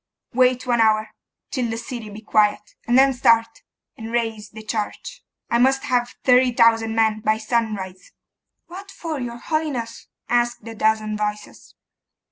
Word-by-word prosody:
Wait 250 0 +2
one 240 -2 +2
hour, 215 -1 +3 0.4
till 250 -4 -1
the 225 - -3
city 235 -2 -7
be 210 +1 -10
quiet; 210 -1 +1
and 240 +1 +3
then 270 0 +5
start, 230 - +2 0.3
and 225 -2 -8
raise 225 -3 -2
the 220 0 -11
church. 225 - -5 0.3
I 235 - +3
must 270 +2 +3
have 245 -3 -1
thirty 250 0 +5
thousand 225 -1 +3
men 220 -1 +2
by 215 0 +1
sunrise.' 215 -5 -3 0.5
'What 380 +3 -10
for, 330 -6 -5
your 240 -2 -5
holiness?' 260 -5 -3 0.2
asked 240 -1 0
a 225 - -6
dozen 215 -1 0
voices. 210 0 -5
230 Hz, 150 wpm, -22 LUFS, 215-250 Hz, 0.5 s, then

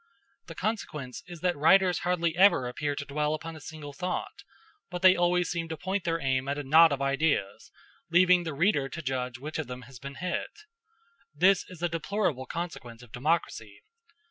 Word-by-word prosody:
The - - -9
consequence 150 - -4
is 175 -3 -10
that 180 -1 +1
writers 180 +5 +4
hardly 170 -3 0
ever 185 -9 +5
appear 145 +4 -3
to 140 - -5
dwell 150 +2 -1
upon 165 +1 -7
a - - -10
single 150 -1 -9
thought, 180 +5 -4 0.5
but 180 +1 -6
they 185 0 +8
always 175 0 +1
seem 165 -1 -3
to 160 - -4
point 190 +2 -3
their 165 -1 0
aim 130 -2 0
at 140 +1 -1
a 145 - -3
knot 160 +4 +6
of 140 -1 -1
ideas, 140 -7 0 0.4
leaving 180 +1 +5
the 160 -4 -5
reader 145 -4 +2
to 170 - -6
judge 125 -2 -3
which 150 +5 -6
of 155 - -3
them 125 0 -7
has 130 +1 -13
been 140 +1 -8
hit. 180 - -4 0.7
This 185 +5 +4
is 175 -2 -11
a - - +3
deplorable 165 -5 -2
consequence 125 -9 -6
of 120 - -16
democracy. 120 -7 -2
160 Hz, 190 wpm, -28 LUFS, 135-175 Hz, 0.7 s, they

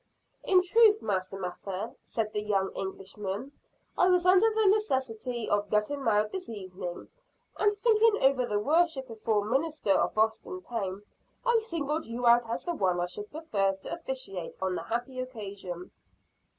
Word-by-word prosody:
"In 370 -1 +5
truth, 430 +2 +5
Master 190 -1 -2
Mather," 190 +3 -5
said 215 -2 -3
the 210 - -1
young 200 -2 0
Englishman, 195 +5 -5 0.4
"I 365 - +4
was 360 -1 +3
under 380 +4 +6
the 440 0 +1
necessity 260 - 0
of 205 0 0
getting 215 +7 0
married 210 -2 +2
this 375 -1 -5
evening; 185 -4 -7 0.5
and, 415 - +3
thinking 435 0 +3
over 265 -2 +4
the 210 - 0
worshipful 255 -6 +1
ministers 265 - +1
of - - 0
Boston 220 - 0
town, 200 -4 -4 0.4
I 475 -2 +4
singled 325 - -3
you 240 +2 -4
out 235 0 +5
as 230 - -2
the 350 - -2
one 185 - +1
I 175 - +1
should 205 +4 -7
prefer 215 -12 0
to 190 - -7
officiate 260 - -5
on 190 -1 -1
the - - -3
happy 245 +3 -3
occasion." 200 -8 -6
230 Hz, 155 wpm, -29 LUFS, 200-325 Hz, 0.5 s, under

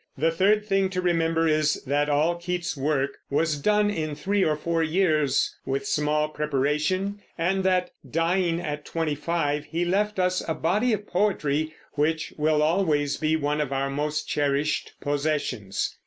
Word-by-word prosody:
The 160 +4 +2
third 205 +5 +2
thing 195 -2 +1
to 185 -1 -3
remember 165 -2 +1
is 155 -1 +2
that 145 +2 +1
all 150 +4 +3
Keats's 175 0 -3
work 140 -1 -1
was 150 +1 +1
done 210 +5 +2
in 155 -6 -3
three 195 +6 0
or 155 -3 +2
four 165 +2 -1
years, 155 -4 +2
with 135 +1 -2
small 150 +1 +1
preparation, 150 +7 -1 0.2
and 190 +3 +1
that, 185 -1 +2 0.2
dying 170 +2 +1
at 150 -3 -4
twenty 160 -1 -2
five, 150 -1 -1
he 165 +4 -2
left 205 +4 0
us 185 0 +1
a 160 - -1
body 210 +9 +1
of 210 -1 -1
poetry 155 -6 0 0.2
which 155 +2 0
will 150 0 +2
always 155 -4 +1
be 155 0 +1
one 150 0 0
of 140 -3 -2
our 135 0 -1
most 150 +2 -2
cherished 145 +1 0
possessions. 145 -8 -1
155 Hz, 160 wpm, -25 LUFS, 150-180 Hz, 0.2 s, all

